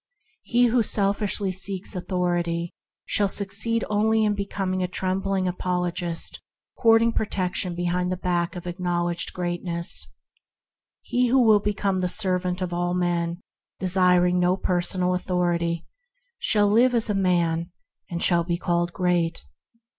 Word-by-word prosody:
He 245 Hz, +1 st, +2 dB
who 240 Hz, 0 st, +3 dB
selfishly 200 Hz, -1 st, +1 dB
seeks 190 Hz, +2 st, -5 dB
authority 175 Hz, -2 st, -1 dB, 0.3 s
shall 205 Hz, -2 st, +2 dB
suc 195 Hz, 0 st, -1 dB
ceed 230 Hz, +3 st, +1 dB
only 220 Hz, +1 st, +2 dB
in 210 Hz, -, +2 dB
becoming 195 Hz, -2 st, -2 dB
a 180 Hz, -, 0 dB
trembling 190 Hz, +1 st, -1 dB
apologist, 180 Hz, -1 st, -2 dB, 0.3 s
courting 230 Hz, 0 st, +4 dB
protection 185 Hz, -3 st, -1 dB
behind 175 Hz, +1 st, -1 dB
the 185 Hz, -, -2 dB
back 175 Hz, 0 st, -1 dB
of 180 Hz, -, -7 dB
acknowledged 175 Hz, -1 st, -2 dB
greatness. 170 Hz, -, -2 dB, 0.9 s
He 250 Hz, 0 st, 0 dB
who 260 Hz, +3 st, +3 dB
will 215 Hz, -2 st, +5 dB
be 205 Hz, 0 st, -2 dB
come 195 Hz, -1 st, 0 dB
the 180 Hz, -, 0 dB
servant 180 Hz, -1 st, -1 dB
of 175 Hz, -1 st, -4 dB
all 175 Hz, 0 st, -1 dB
men, 175 Hz, -1 st, -1 dB, 0.4 s
desiring 180 Hz, -1 st, +4 dB
no 180 Hz, +1 st, +2 dB
personal 180 Hz, 0 st, 0 dB
authority, 175 Hz, -2 st, -1 dB, 0.5 s
shall 205 Hz, -1 st, +3 dB
live 240 Hz, +4 st, +4 dB
as 230 Hz, -, +1 dB
a 210 Hz, -, 0 dB
man, 170 Hz, -3 st, +1 dB, 0.4 s
and 170 Hz, -1 st, -3 dB
shall 170 Hz, -2 st, +3 dB
be 170 Hz, 0 st, -2 dB
called 175 Hz, 0 st, 0 dB
great. 175 Hz, -2 st, 0 dB
180 Hz, 140 wpm, -24 LUFS, 175-200 Hz, 0.9 s, will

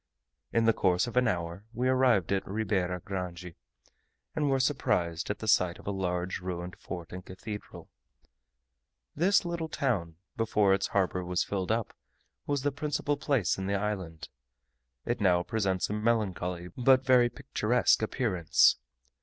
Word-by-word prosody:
In 115 Hz, -, +2 dB
the 115 Hz, -, +5 dB
course 90 Hz, -1 st, +2 dB
of 120 Hz, -, -7 dB
an 125 Hz, -1 st, +4 dB
hour 85 Hz, -1 st, -2 dB
we 125 Hz, +2 st, 0 dB
arrived 130 Hz, -9 st, +3 dB
at 95 Hz, -1 st, 0 dB
Ribeira 95 Hz, -4 st, -1 dB
Grande, 90 Hz, -2 st, -5 dB, 0.8 s
and 150 Hz, -2 st, +1 dB
were 135 Hz, -1 st, +2 dB
surprised 90 Hz, -, 0 dB
at 105 Hz, -, -1 dB
the 110 Hz, -, -7 dB
sight 90 Hz, -4 st, +3 dB
of -, -, -15 dB
a 100 Hz, -, -1 dB
large 90 Hz, -1 st, -2 dB
ruined 90 Hz, -1 st, -5 dB
fort 85 Hz, -3 st, -7 dB
and 90 Hz, 0 st, -7 dB
cathedral. 105 Hz, +3 st, -8 dB, 1.3 s
This 185 Hz, +5 st, +3 dB
little 170 Hz, -2 st, -3 dB
town, 100 Hz, -, -1 dB, 0.2 s
before 105 Hz, -4 st, +2 dB
its 95 Hz, 0 st, +1 dB
harbour 90 Hz, -2 st, 0 dB
was 90 Hz, 0 st, 0 dB
filled 95 Hz, 0 st, -2 dB
up, 115 Hz, -1 st, -1 dB, 0.5 s
was 145 Hz, -2 st, 0 dB
the 145 Hz, -, +1 dB
principal 145 Hz, +1 st, -1 dB
place 130 Hz, -, 0 dB
in 95 Hz, -, -3 dB
the 100 Hz, -, 0 dB
island: 95 Hz, -6 st, -4 dB, 0.8 s
it 120 Hz, -1 st, -2 dB
now 90 Hz, -3 st, +3 dB
presents 95 Hz, -3 st, 0 dB
a -, -, -4 dB
melancholy, 95 Hz, -6 st, -1 dB
but 130 Hz, +1 st, +4 dB
very 125 Hz, -2 st, +5 dB
picturesque 125 Hz, -4 st, +1 dB
appearance. 105 Hz, -, +3 dB
100 Hz, 155 wpm, -29 LUFS, 90-125 Hz, 1.3 s, the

